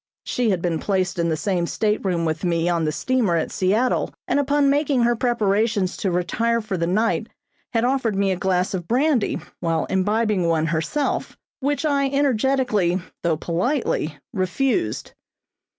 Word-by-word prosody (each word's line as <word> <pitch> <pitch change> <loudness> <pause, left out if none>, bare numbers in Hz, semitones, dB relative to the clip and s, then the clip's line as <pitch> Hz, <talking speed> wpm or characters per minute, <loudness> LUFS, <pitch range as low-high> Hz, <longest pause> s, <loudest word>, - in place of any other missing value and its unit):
She 245 -2 0
had 185 -4 0
been 170 -3 0
placed 190 -1 -1
in 170 0 +1
the 160 - 0
same 175 +1 -1
stateroom 195 -6 0
with 160 +1 -2
me 170 -1 +1
on 170 -2 +1
the 155 - +1
steamer 220 - +1
at 165 - -1
Seattle, 215 +7 +1 0.2
and - - +2
upon 285 0 +2
making 280 -3 +2
her 240 0 +3
preparations 215 -4 +1
to 195 - -1
retire 230 +7 0
for 215 -3 -4
the 170 -1 -1
night 215 +6 +1 0.5
had 230 -1 +2
offered 245 -4 +1
me 195 0 +1
a - - +1
glass 185 0 0
of 175 -3 -4
brandy, 260 0 +2 0.2
while 165 -1 0
imbibing 205 -1 +1
one 160 -1 +2
herself, 165 - -1 0.2
which 290 +2 -1
I 280 -2 +2
energetically, 255 -8 +1 0.2
though 165 -2 +1
politely, 170 - -1 0.2
refused. 185 - -1
200 Hz, 160 wpm, -22 LUFS, 175-250 Hz, 0.5 s, her